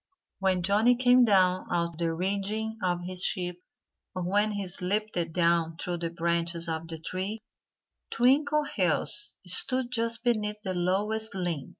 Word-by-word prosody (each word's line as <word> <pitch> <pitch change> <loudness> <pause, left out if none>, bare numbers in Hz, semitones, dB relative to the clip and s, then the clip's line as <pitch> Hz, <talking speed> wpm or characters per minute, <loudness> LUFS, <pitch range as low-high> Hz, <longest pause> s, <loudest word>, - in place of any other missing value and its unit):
When 190 -2 +1
Johnnie 215 +6 +4
came 250 0 +5
down 185 -3 +3
out 170 -1 0
of 165 - -15
the 165 -1 0
rigging 200 +5 -2
of 175 -1 -1
his 185 0 -1
ship 180 -1 -1 0.6
or 185 - -3
when 205 +4 +1
he 200 -1 -3
slipped 195 +4 -1 0.2
down 170 -1 +1
through 175 +1 -3
the 170 0 -3
branches 170 0 -2
of 160 0 -4
the 165 0 -7
tree 185 +6 -4 0.7
Twinkleheels 280 - +2
stood 255 +7 +2
just 230 -1 0
beneath 210 -3 0
the 190 -2 -3
lowest 205 +5 -1
limb. 175 -7 -3
185 Hz, 150 wpm, -28 LUFS, 175-220 Hz, 0.7 s, came